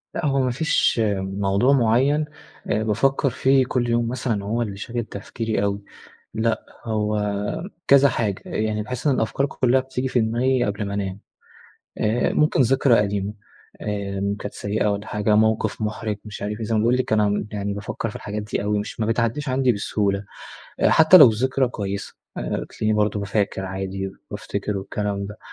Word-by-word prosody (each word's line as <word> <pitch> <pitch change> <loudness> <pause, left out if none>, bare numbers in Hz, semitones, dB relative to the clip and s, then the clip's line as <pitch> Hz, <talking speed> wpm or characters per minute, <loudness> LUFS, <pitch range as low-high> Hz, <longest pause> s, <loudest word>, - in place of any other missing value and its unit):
لأ 170 - -2
هو 135 -2 +2
ما 130 -1 +1
فيش 135 -3 +2 0.2
موضوع 100 +6 +1
معيّن 135 +5 +3 0.4
أ 110 +1 +1
بافكّر 135 +6 +1
فيه 130 +1 +3
كل 120 -1 -1
يوم 120 0 +1
مثلًا 115 -4 -2
هو 115 +4 -1
اللي 100 -4 -3
شاغل 120 +3 -3
تفكيري 110 0 -3
أوي. 100 0 -1 0.5
لأ، 110 0 0 0.2
هو 105 -1 0 0.7
كذا 140 0 +7
حاجة. 110 -6 -2
يعني 110 0 -1
باحس 125 +5 -5
إن 140 - +4
الأفكار 125 +4 0
كُلّها 130 -1 +2
بتيجي 130 0 -3
في 125 - +1
دماغي 120 +3 +1
قبل 105 0 -2
ما 100 - -4
أنام. 100 -1 -3 0.8
آآ 110 +3 +1
ممكن 150 -2 +2
ذكرى 130 -1 +4
قديمة 100 0 -2 0.5
آمم 100 -1 -2
كانت 105 0 -7
سيئة 105 +1 -1
والّا 100 +2 -4
حاجة، 105 0 +1
موقف 110 +1 +2
مُحرِج 105 0 -2
مش 105 -2 -8
عارف 105 +1 -3
إيه. - - -2
زي 110 - -1
ما - - +3
باقول 120 +3 +3
لِك 130 -3 -1
أنا 105 -1 +2
يعني 100 -1 -2
بافكّر 110 +2 -4
في - - -8
الحاجات 105 0 -5
دي 105 -1 -3
أوي 105 0 0
مش 105 - -5
ما 110 - +1
بتعدّيش 115 +5 0
عندي 130 -1 +2
بسهولة. 100 -1 -1 0.6
أ - - +5
حتّى 160 +3 +7
لو 150 -8 +10
الذكرى 130 +3 +1
كويسة، 100 -4 -5 0.2
آآ - - -2
تلاقيني 110 0 -1
برضه 105 -1 +1
ب - - -3
فاكر 100 -1 -1
عادي 95 +1 -4 0.2
بافتكر 100 0 -3
والكلام 100 0 -3
ده. 105 +1 -10
110 Hz, 180 wpm, -23 LUFS, 100-125 Hz, 0.8 s, لو